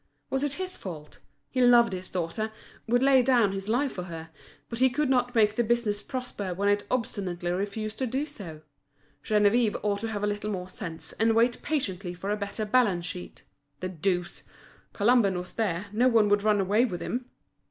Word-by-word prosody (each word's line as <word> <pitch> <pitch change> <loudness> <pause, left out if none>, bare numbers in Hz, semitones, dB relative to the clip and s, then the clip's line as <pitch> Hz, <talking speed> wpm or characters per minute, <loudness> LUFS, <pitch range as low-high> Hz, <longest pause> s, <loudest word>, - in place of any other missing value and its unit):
Was 270 - +1
it 290 -1 0
his 370 +2 -4
fault? 155 -5 -9 0.3
He 255 - +1
loved 240 -3 +6
his 185 0 -6
daughter—would 220 +7 -2
lay 270 -1 +6
down 240 -5 +3
his 195 0 -5
life 260 +4 +1
for 180 - -5
her; 165 -2 -8 0.4
but 230 - -4
he 260 0 +5
could 270 +2 0
not 245 -1 +1
make 210 -2 +4
the 240 - +2
business 220 -3 0
prosper 210 -8 -4
when 200 +2 +1
it 205 0 +1
obstinately 185 -7 -2
refused 205 +3 -3
to 260 - 0
do 265 +5 -1
so. 175 - -9 0.6
Geneviève 210 +1 +3
ought 205 -1 0
to 225 - -3
have 210 -2 -3
a - - +3
little 205 0 -2
more 185 -3 -4
sense, 170 -6 -7
and 225 0 +3
wait 240 +2 +3
patiently 190 - -2
for 195 +3 -4
a - - +2
better 210 +1 -3
balance 210 -7 +2
sheet. 180 +1 -8 0.4
The 185 - -3
deuce! 180 0 -1 0.5
Colomban 205 -3 +3
was 180 +1 -6
there, 200 -4 -1
no 240 +4 +4
one 225 -4 +4
would 205 0 +3
run 210 0 +3
away 205 +4 +3
with 185 -9 -2
him! 245 +6 -4
210 Hz, 195 wpm, -28 LUFS, 185-245 Hz, 0.6 s, loved